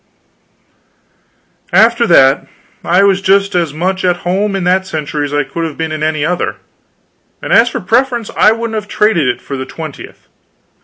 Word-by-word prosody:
After 235 +1 +4
that, 135 -5 +4 0.4
I 180 +3 +3
was 195 -1 +2
just 195 +1 +2
as 170 -4 0
much 185 +5 -2
at 180 -1 +1
home 195 +3 0
in 195 - -2
that 185 +1 +1
century 150 -3 -3
as 145 - -6
I 145 0 0
could 165 +5 -5
have 160 -3 -5
been 160 -1 -3
in 155 -1 -4
any 155 -1 -1
other; 180 +2 -2 0.8
and - - -3
as 235 +1 +5
for 250 - -5
preference, 235 +3 0
I 215 - +5
wouldn't 230 0 -3
have 215 -1 -4
traded 210 -8 +1
it - - -2
for 140 - -6
the 130 - -5
twentieth. 155 -1 -10
185 Hz, 175 wpm, -14 LUFS, 155-210 Hz, 0.8 s, as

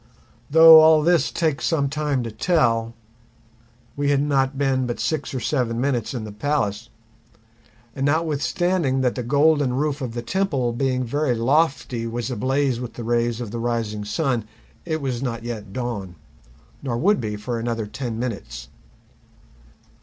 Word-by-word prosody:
Though 160 +1 +9
all 155 -1 +6
this 175 0 +2
takes 155 -3 -1
some 145 -4 +1
time 145 -2 -1
to 115 - -5
tell, 115 -4 +1 1.0
we 145 0 0
had 140 -1 +3
not 135 -1 0
been 135 -2 +1
but 120 - -4
six 150 -4 -2
or 130 - -3
seven 120 -3 -1
minutes 130 -2 -1
in 115 - -4
the 105 - -7
palace; 110 -2 -2 1.1
and 135 +1 0
notwithstanding 155 -1 0
that 125 -2 +1
the 125 - -4
golden 145 +1 +2
roof 145 +2 -1
of 120 -3 -5
the 120 - -4
temple 140 -8 -1
being 130 0 0
very 135 +1 0
lofty 130 -1 0
was 120 +3 -4
ablaze 130 +2 0
with 125 -1 -6
the 120 - -7
rays 120 0 0
of 115 -4 -5
the 120 - -4
rising 115 -3 -2
sun, 115 +2 -1 0.4
it 160 -2 -2
was 130 -3 -2
not 120 -3 -3
yet 110 -4 -6
dawn, 105 -6 -4 0.7
nor 125 -4 -2
would 200 - +2
be 105 -2 -3
for 115 +3 -4
another 115 -1 -2
ten 115 +1 -5
minutes. 60 - -5
125 Hz, 160 wpm, -22 LUFS, 115-145 Hz, 1.1 s, Though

